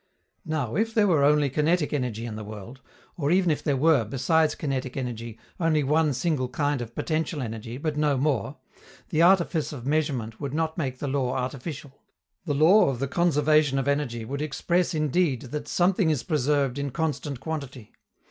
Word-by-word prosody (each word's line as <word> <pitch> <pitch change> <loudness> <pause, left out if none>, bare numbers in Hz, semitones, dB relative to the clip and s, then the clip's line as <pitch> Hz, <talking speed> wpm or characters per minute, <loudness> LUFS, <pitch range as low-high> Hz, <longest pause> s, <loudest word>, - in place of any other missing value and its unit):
Now, 150 -6 -2
if 225 +4 0
there 215 -2 +4
were 160 -8 +3
only 150 0 +4
kinetic 150 +4 +1
energy 125 -5 -2
in 115 -2 -5
the 110 - -6
world, 110 +5 -9 0.4
or 145 -4 -1
even 180 0 +3
if 150 - -1
there 140 -3 +1
were, 150 -3 +4
besides 150 +7 +1
kinetic 135 -3 -3
energy, 115 -3 -5 0.2
only 160 -3 +2
one 150 +2 +2
single 130 -2 -1
kind 145 0 -1
of 115 -1 -8
potential 160 -1 -2
energy, 115 -1 -5
but 150 +1 -3
no 150 -2 +2
more, 135 -6 -1 0.5
the 155 - +1
artifice 170 -3 +3
of 130 -5 -8
measurement 135 -7 -1
would 140 0 -3
not 160 0 -1
make 130 -6 -3
the 145 - -4
law 130 -2 0
artificial. 135 +2 -5 0.4
The 145 -4 -1
law 165 +6 +5
of 135 - -2
the 140 +3 -2
conservation 150 -2 +2
of 135 0 -1
energy 135 -6 -1
would 140 +5 -4
express 170 +4 0
indeed 155 -2 +1
that 145 +3 -6
something 180 +1 +2
is 150 -6 0
preserved 145 -3 0
in 140 0 -2
constant 150 -2 -3
quantity. 140 -7 -6
145 Hz, 180 wpm, -26 LUFS, 130-155 Hz, 0.5 s, law